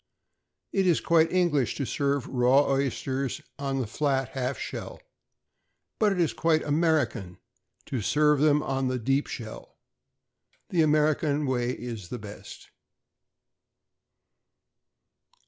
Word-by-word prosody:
It 195 Hz, -1 st, +2 dB
is 170 Hz, -, +4 dB
quite 165 Hz, -1 st, +3 dB
English 170 Hz, -9 st, +1 dB
to 140 Hz, -, -2 dB
serve 140 Hz, -1 st, -1 dB
raw 130 Hz, +2 st, +3 dB
oysters 135 Hz, -1 st, -1 dB, 0.2 s
on 135 Hz, -1 st, -2 dB
the 130 Hz, -, -1 dB
flat 135 Hz, +2 st, -1 dB
half 130 Hz, 0 st, -3 dB
shell, -, -, -6 dB, 1.0 s
but 215 Hz, -2 st, +3 dB
it 195 Hz, -, -1 dB
is 165 Hz, -3 st, +2 dB
quite 160 Hz, -1 st, +1 dB
American 145 Hz, -, 0 dB, 0.5 s
to 130 Hz, -, -3 dB
serve 150 Hz, +6 st, +3 dB
them 150 Hz, 0 st, +3 dB
on 135 Hz, -1 st, -1 dB
the 130 Hz, 0 st, -1 dB
deep 135 Hz, +4 st, 0 dB
shell. 110 Hz, -2 st, -8 dB, 0.9 s
The 175 Hz, -, +2 dB
American 150 Hz, -1 st, +2 dB
way 125 Hz, -2 st, 0 dB
is 115 Hz, -8 st, -7 dB
the 125 Hz, -, -4 dB
best. 105 Hz, -2 st, -11 dB
140 Hz, 120 wpm, -27 LUFS, 125-155 Hz, 1.0 s, is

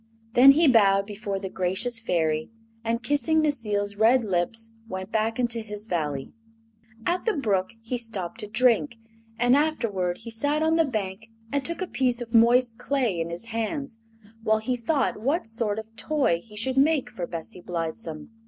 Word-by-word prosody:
Then 270 Hz, +3 st, +9 dB
he 320 Hz, +2 st, +4 dB
bowed 200 Hz, -5 st, +5 dB
before 205 Hz, -1 st, -4 dB
the 195 Hz, 0 st, -5 dB
gracious 190 Hz, +6 st, -1 dB
Fairy 160 Hz, -7 st, 0 dB, 0.3 s
and, 230 Hz, +1 st, -1 dB
kissing 290 Hz, +4 st, +2 dB
Necile's 210 Hz, -8 st, -1 dB
red 230 Hz, +3 st, +4 dB
lips, 220 Hz, +5 st, -1 dB, 0.2 s
went 190 Hz, +1 st, -5 dB
back 225 Hz, 0 st, 0 dB
into 240 Hz, -2 st, 0 dB
his 210 Hz, -1 st, -6 dB
Valley. 150 Hz, -8 st, -3 dB, 0.7 s
At 355 Hz, +1 st, 0 dB
the 445 Hz, -, +2 dB
brook 205 Hz, -, 0 dB
he 245 Hz, +2 st, -2 dB
stopped 205 Hz, -7 st, -3 dB
to 210 Hz, -, -6 dB
drink, 235 Hz, +3 st, +2 dB, 0.4 s
and 245 Hz, +2 st, +4 dB
afterward 220 Hz, -, 0 dB
he 230 Hz, -, -9 dB
sat 290 Hz, +7 st, 0 dB
on 320 Hz, +1 st, +3 dB
the 330 Hz, 0 st, +4 dB
bank 215 Hz, -4 st, -4 dB, 0.2 s
and 280 Hz, -1 st, 0 dB
took 335 Hz, +4 st, -1 dB
a -, -, -4 dB
piece 255 Hz, -5 st, 0 dB
of 235 Hz, -2 st, -7 dB
moist 235 Hz, 0 st, +4 dB
clay 245 Hz, -8 st, 0 dB
in 165 Hz, -, -3 dB
his 175 Hz, +8 st, -6 dB
hands 230 Hz, +2 st, -3 dB, 0.4 s
while 220 Hz, 0 st, +2 dB
he 250 Hz, +4 st, -1 dB
thought 255 Hz, -2 st, 0 dB
what 280 Hz, +7 st, 0 dB
sort 225 Hz, -2 st, 0 dB
of 220 Hz, +1 st, -8 dB
toy 220 Hz, -, +1 dB
he 215 Hz, -2 st, -15 dB
should 260 Hz, +4 st, 0 dB
make 285 Hz, -1 st, +3 dB
for 180 Hz, -7 st, -5 dB
Bessie 170 Hz, +1 st, -6 dB
Blithesome. 165 Hz, 0 st, -5 dB
225 Hz, 175 wpm, -26 LUFS, 195-255 Hz, 0.7 s, Then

